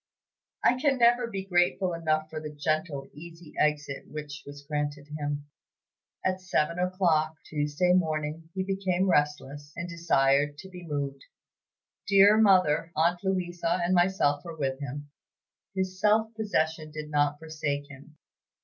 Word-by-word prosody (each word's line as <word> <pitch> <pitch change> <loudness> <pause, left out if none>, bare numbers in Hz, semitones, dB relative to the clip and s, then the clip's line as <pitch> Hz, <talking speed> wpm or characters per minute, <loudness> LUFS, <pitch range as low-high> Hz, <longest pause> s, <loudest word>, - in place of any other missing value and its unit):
I 250 +1 +4
can 275 -2 +3
never 240 0 +4
be 195 -4 -5
grateful 180 0 +2
enough 155 -2 0
for 155 - -4
the 155 - -5
gentle, 150 -1 -2
easy 165 +1 -12
exit 145 -2 0
which 150 -2 -7
was 145 0 -10
granted 145 -1 -3
him. 145 -1 -3 0.8
At 185 0 0
seven 170 -2 0
o'clock, 175 -4 +1
Tuesday 150 +4 +1
morning, 160 -2 -1
he 190 - 0
became 190 -1 0
restless, 145 -1 -1
and 170 - -4
desired 145 -4 +2
to 190 +5 -10
be 180 -2 -10
moved. 140 -2 -3 0.9
Dear 200 +1 +7
Mother, 180 -6 +4
aunt 170 +3 +2
Louisa, 175 -2 -1
and 175 +2 +1
myself 175 -5 +2
were 165 -2 -8
with 135 -2 -2
him. 145 +1 -6 0.6
His 185 0 -2
self 220 +1 +3
possession 160 -8 -1
did 155 0 -7
not 145 0 +2
forsake 150 -2 -3
him. 140 +2 -14
160 Hz, 140 wpm, -28 LUFS, 145-185 Hz, 0.9 s, Dear